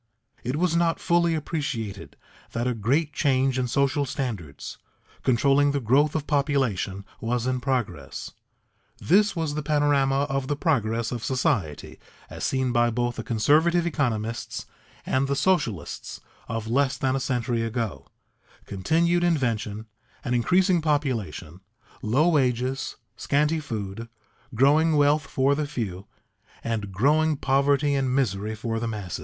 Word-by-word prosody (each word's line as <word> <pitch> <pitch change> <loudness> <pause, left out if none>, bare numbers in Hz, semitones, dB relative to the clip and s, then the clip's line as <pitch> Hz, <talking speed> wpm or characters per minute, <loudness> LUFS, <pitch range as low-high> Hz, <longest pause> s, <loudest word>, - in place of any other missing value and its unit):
It 125 +3 -2
was 170 +1 +1
not 170 -1 +2
fully 170 -1 +2
appreciated 130 - -4 0.4
that 120 +1 -1
a 125 - +1
great 140 +8 0
change 135 -2 +1
in 125 - 0
social 140 +3 +1
standards, 115 - -5 0.4
controlling 140 +3 +3
the 140 - +1
growth 140 +6 +2
of 155 -2 -1
population, 135 - 0
was 120 +1 -1
in 130 0 0
progress. 110 - -3 0.7
This 205 +4 +3
was 160 -3 -1
the 150 - -2
panorama 145 -2 +2
of 135 -1 -2
the 145 - 0
progress 115 - 0
of 120 -3 -4
society 100 - -1 0.3
as - - -7
seen 130 -1 0
by 120 0 +3
both 120 +1 -1
the - - -4
conservative 155 +9 +3
economists 115 -8 -2 0.4
and 130 +1 +1
the 140 - 0
socialists 125 - -1 0.3
of 115 -1 -4
less 135 +3 +1
than 130 0 0
a - - 0
century 120 -3 -1
ago: 115 - -3 0.6
continued 165 - +1
invention, 115 -10 0 0.4
an 125 - -1
increasing 180 - +3
population, 115 - -2 0.4
low 130 +10 +2
wages, 130 -4 0 0.2
scanty 150 +3 +1
food, 115 -5 -5 0.5
growing 150 +6 +4
wealth 145 +1 +3
for 135 +1 +2
the 150 0 -1
few, 100 -9 -5 0.6
and 110 -4 -3
growing 150 +9 +2
poverty 140 +2 +2
and 135 -2 0
misery 110 -5 0
for 115 +1 -3
the 115 - -2
masses. 105 -7 -4
130 Hz, 140 wpm, -25 LUFS, 115-145 Hz, 0.7 s, growing